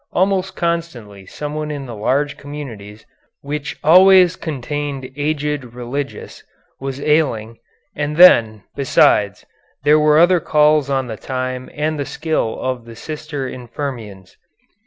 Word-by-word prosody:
Almost 190 0 0
constantly 125 - -4
someone 150 +1 -5
in 145 -2 -5
the 120 - -8
large 140 +7 -1
communities, 115 -9 -9 0.4
which 150 +1 -5
always 185 +2 +6
contained 145 -2 -5
aged 150 -1 -2
religious, 130 +3 -6 0.4
was 135 0 -5
ailing, 135 -7 0 0.4
and 150 +1 -3
then, 115 - +6
besides, 105 -6 +2 0.4
there 150 +1 +5
were 150 0 +4
other 175 +2 +5
calls 150 -2 +3
on 135 -1 0
the 110 -3 -7
time 130 0 -4
and 155 0 -2
the 140 - -2
skill 155 -8 -2
of 130 -2 -3
the 115 -1 -11
sister 150 +1 -6
infirmarians. 120 -7 -7
145 Hz, 125 wpm, -18 LUFS, 125-155 Hz, 0.4 s, always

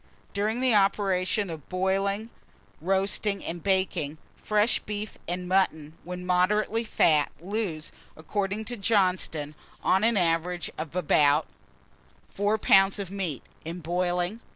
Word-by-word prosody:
DURING 215 +4 -1
THE 255 -2 +3
OPERATIONS 195 -1 +2
OF 155 -4 -9
BOILING, 195 +4 -1 0.5
BOASTING, 195 +2 +1
AND 170 0 -5
BAKING, 185 -6 0 0.2
fresh 210 +2 +2
beef 210 0 -6
and 180 +1 -3
mutton, 160 -5 +1
when 180 0 -6
moderately 210 +5 +2
fat, 155 -8 +3
lose, 180 -4 -3 0.3
according 200 +6 -3
to 245 +1 -4
Johnston, 185 -8 +1 0.3
on 190 +2 +3
an 230 -1 +3
average 175 0 0
about 155 -2 +2 0.9
In 195 - +1
boiling. 180 +4 -1
190 Hz, 105 wpm, -27 LUFS, 170-205 Hz, 0.9 s, THE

